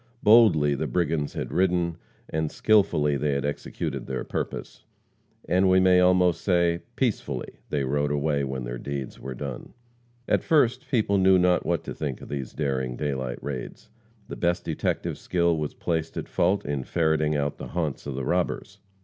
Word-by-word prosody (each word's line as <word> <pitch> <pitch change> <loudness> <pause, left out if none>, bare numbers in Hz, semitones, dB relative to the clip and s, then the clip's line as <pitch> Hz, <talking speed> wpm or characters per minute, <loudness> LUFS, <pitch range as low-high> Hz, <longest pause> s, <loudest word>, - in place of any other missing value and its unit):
Boldly 105 -10 +6
the 70 - -2
brigands 80 -4 -1
had - - -4
ridden, 90 -2 +1 0.3
and 80 -1 -2
skillfully 75 -9 +3
they 75 +1 0
had 70 0 -1
executed 75 - -4
their 65 - -3
purpose, - - -5 0.6
and, 95 +2 +3
we 95 0 +5
may 95 -1 +5
almost 90 -1 +4
say, 85 -2 +2 0.2
peacefully 100 - -2
they 70 -2 0
rode 70 +2 0
away 75 0 0
when 65 -1 -3
their - - -5
deeds 70 -1 -5
were 65 0 -6
done. 70 - -7 0.5
At - - +2
first, 130 -5 +2
people 105 -5 +2
knew 95 0 +6
not 90 0 +2
what 85 -2 0
to - - -6
think 70 -5 -4
of - - -11
these 70 -3 -4
daring 65 -4 -2
daylight 65 -3 -3
raids. 70 -3 -6 0.4
The - - -6
best 85 0 0
detective 80 - -2
skill 85 -2 +1
was 75 -2 -3
placed 80 -1 -2
at - - -4
fault 95 +4 +1
in 70 -2 -2
ferreting 80 0 +1
out 70 0 -1
the - - -6
haunts 80 -5 -3
of 70 - -4
the 65 -1 -3
robbers. 90 +4 -1
80 Hz, 175 wpm, -26 LUFS, 70-90 Hz, 0.6 s, Boldly